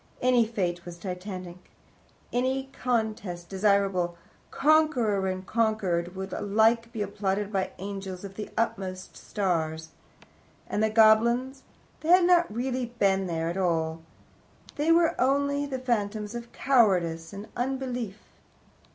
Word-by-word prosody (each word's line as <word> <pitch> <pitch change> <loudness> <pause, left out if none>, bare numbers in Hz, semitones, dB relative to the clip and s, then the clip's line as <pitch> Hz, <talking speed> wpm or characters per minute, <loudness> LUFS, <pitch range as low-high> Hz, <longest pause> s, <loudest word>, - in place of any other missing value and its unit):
Any 245 -2 +3
fate 180 -6 -2
was 175 -1 -9
titanic; 180 -1 -7 0.6
any 265 +2 -1
contest 215 -8 -2
desirable; 195 -3 +1 0.3
conqueror 265 -10 +2
and 185 0 -3
conquered 195 -6 0
would 190 0 -5
alike 225 +3 +2
be 220 -3 -2
applauded 200 +1 -2
by 190 -1 +1
the - - -14
angels 195 -2 -6
of 195 -1 -7
the 210 +1 -6
utmost 185 -5 -2
stars. 160 -5 -2 0.8
And 210 - -2
the 220 - +3
goblins 235 +4 +4 0.4
they 315 - -5
had 360 0 +7
not 350 -6 +4
really 250 +2 -2
been 195 -2 +2
there 165 -1 -2
at 175 - -5
all? 165 -3 0 0.7
They 300 +3 +2
were 335 0 +4
only 280 +2 +1
the 265 -2 -3
phantoms 215 -4 -2
of 235 0 -7
cowardice 180 -11 +2
and 200 +1 -8
unbelief? 245 -5 -3
210 Hz, 130 wpm, -27 LUFS, 185-245 Hz, 0.8 s, had